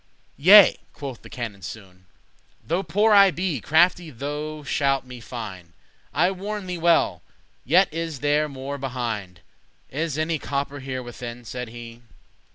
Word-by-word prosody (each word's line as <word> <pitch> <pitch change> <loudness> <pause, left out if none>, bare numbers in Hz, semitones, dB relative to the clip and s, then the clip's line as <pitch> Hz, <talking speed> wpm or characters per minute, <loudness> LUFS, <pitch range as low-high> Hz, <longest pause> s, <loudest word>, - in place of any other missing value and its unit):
"Yea," 195 +7 +8
quoth 135 -5 -7
the - - -13
canon 115 -5 -6
soon, 95 -3 -10 0.6
"Though 170 +4 0
poor 205 +5 +2
I 200 -1 +8
be, 175 - -2
crafty* 175 - +3
thou 150 +3 -5
shalt 135 -1 0
me 125 -1 -10
find; 95 -9 -8 0.3
*skilful - - -35
I 175 +5 +3
warn 200 +1 -5
thee 180 -1 -4
well, 165 - +3 0.4
yet 180 +8 +4
is 165 -4 -4
there 150 +1 +2
more 140 +1 -6
behind. 115 -9 -4 0.5
Is 155 +1 -2
any 155 0 0
copper 140 +1 -3
here 130 -1 -5
within?" 120 0 -8
said 125 +1 -5
he. 120 0 -10
140 Hz, 150 wpm, -24 LUFS, 120-165 Hz, 0.6 s, Yea